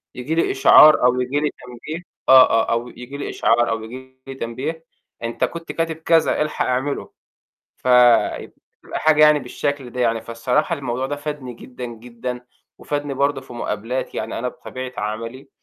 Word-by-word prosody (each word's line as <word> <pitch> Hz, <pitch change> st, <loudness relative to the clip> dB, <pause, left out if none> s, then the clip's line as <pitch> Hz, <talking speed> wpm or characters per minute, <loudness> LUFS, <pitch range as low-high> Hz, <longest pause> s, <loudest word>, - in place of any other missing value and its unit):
ييجي 130 Hz, +6 st, -3 dB
لي 165 Hz, -, +1 dB
إشعار 150 Hz, +2 st, +7 dB
أو 125 Hz, 0 st, +3 dB
ييجي 135 Hz, +4 st, -1 dB
لي 150 Hz, -, 0 dB
تنبيه 135 Hz, +8 st, -9 dB, 0.3 s
آه، 130 Hz, -1 st, +9 dB
آه، 115 Hz, -, +2 dB
أو 115 Hz, +1 st, -1 dB
ييجي 125 Hz, +3 st, -9 dB
لي 145 Hz, -, -5 dB
إشعار 120 Hz, +1 st, +2 dB
أو 115 Hz, -1 st, -2 dB
ييجي 130 Hz, +3 st, -11 dB
لي 135 Hz, -, -7 dB
تنبيه، 135 Hz, +7 st, -5 dB, 0.4 s
أنت 115 Hz, 0 st, -3 dB
كنت 170 Hz, 0 st, -3 dB
كاتب 165 Hz, -1 st, -2 dB
كذا 160 Hz, 0 st, +2 dB
الحَق 150 Hz, 0 st, -1 dB
اعمِلُه، 130 Hz, +3 st, -2 dB, 0.7 s
فيبقى 125 Hz, -2 st, +3 dB, 0.5 s
حاجة 155 Hz, -1 st, +4 dB
يعني 150 Hz, 0 st, +6 dB
بالشكل 140 Hz, -3 st, -4 dB
ده 125 Hz, -, -5 dB
يعني، 115 Hz, -2 st, +1 dB
فالصراحة 125 Hz, +8 st, -1 dB
الموضوع 130 Hz, -3 st, -3 dB
ده 145 Hz, +2 st, -4 dB
فادني 145 Hz, -3 st, -6 dB
جدًا، 125 Hz, +2 st, -10 dB
جدًا 120 Hz, +1 st, -7 dB, 0.3 s
وفادني 145 Hz, -1 st, -3 dB
برضه 140 Hz, 0 st, 0 dB
في 130 Hz, -1 st, -13 dB
مقابلاتي، 120 Hz, +2 st, -4 dB
يعني 110 Hz, -, -4 dB
أنا 125 Hz, -, -2 dB
بطبيعة 130 Hz, +1 st, -8 dB
عملي، 115 Hz, +5 st, -5 dB
130 Hz, 165 wpm, -21 LUFS, 120-145 Hz, 0.7 s, آه